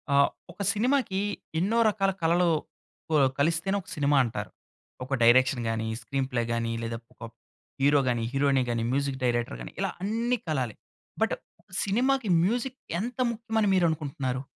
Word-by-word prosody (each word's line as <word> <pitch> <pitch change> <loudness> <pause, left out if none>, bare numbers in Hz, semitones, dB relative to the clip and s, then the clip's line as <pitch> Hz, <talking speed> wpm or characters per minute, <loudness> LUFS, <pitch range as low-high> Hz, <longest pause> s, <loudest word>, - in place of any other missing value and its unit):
ఆహ్, 140 - +5 0.2
ఒక 185 +4 -9
సినిమాకి 245 -3 +1 0.4
ఎన్నో 205 +7 +1
రకాల 195 -2 +1
కళలు 170 +2 +3 0.6
కు - - -2
ఆహ్, 130 - +3
కలిస్తేనే 165 +6 +1
ఒక - - -17
సినిమా 145 -1 +2
అంటారు. 105 -4 -4 0.5
ఒక 135 - -5
డైరెక్షన్ 125 +1 +5
గాని, 110 0 -1
స్క్రీన్‌ప్లే 130 0 -1
గాని 115 0 -1
లేదా 115 0 -3 0.2
ఒక - - -41
ప్ - - -46 0.5
హీరో 145 +1 +5
గాని, 120 -2 +1
హీరోయిన్ 135 -1 +3
గాని, 115 -1 0
మ్యూజిక్ 140 0 -1
డైరెక్టర్ 120 - 0
గాని - - -8
ఇలా - - 0
అన్నీ 230 +4 0
కలాలి. 130 -8 -1 0.5
బట్, - - +2 0.5
సినిమాకి 245 +3 +1
మ్యూజిక్ 245 +6 -1 0.2
ఎంత 235 +4 -4
ముఖ్యం 225 0 -6
అని 210 - +3
మీరనుకుంటున్నారు? 145 -7 0
145 Hz, 155 wpm, -27 LUFS, 125-200 Hz, 0.6 s, ఆహ్